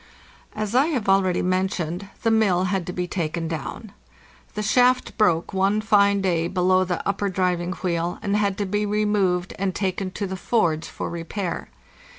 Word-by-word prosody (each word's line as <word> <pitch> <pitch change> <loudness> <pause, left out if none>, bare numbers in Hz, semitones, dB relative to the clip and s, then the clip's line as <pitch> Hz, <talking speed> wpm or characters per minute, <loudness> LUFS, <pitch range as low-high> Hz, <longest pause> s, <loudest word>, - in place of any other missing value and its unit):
As 215 0 -3
I 265 +5 +4
have 260 -11 -2
already 195 -2 +3
mentioned, 185 0 -1 0.2
the 225 - +3
mill 200 -5 +3
had 190 -2 -1
to - - -2
be 180 0 -2
taken 170 -2 -2
down. 165 +7 -6 0.6
The 210 - -2
shaft 250 +4 +3
broke 175 -7 +2
one 195 +2 +2
fine 200 -2 +3
day 170 -3 +1
below 185 +1 +2
the 180 -2 -3
upper 200 0 0
driving 180 -1 0
wheel, 175 -2 -2
and 200 -1 0
had 200 -2 +1
to 205 - -1
be 205 +2 -1
removed 205 -4 +1
and 190 -2 -1
taken 190 -1 -1
to 200 - -3
the 190 0 -4
forge 170 -6 0
for - - -5
repair. 170 +2 -4
190 Hz, 170 wpm, -23 LUFS, 180-205 Hz, 0.6 s, I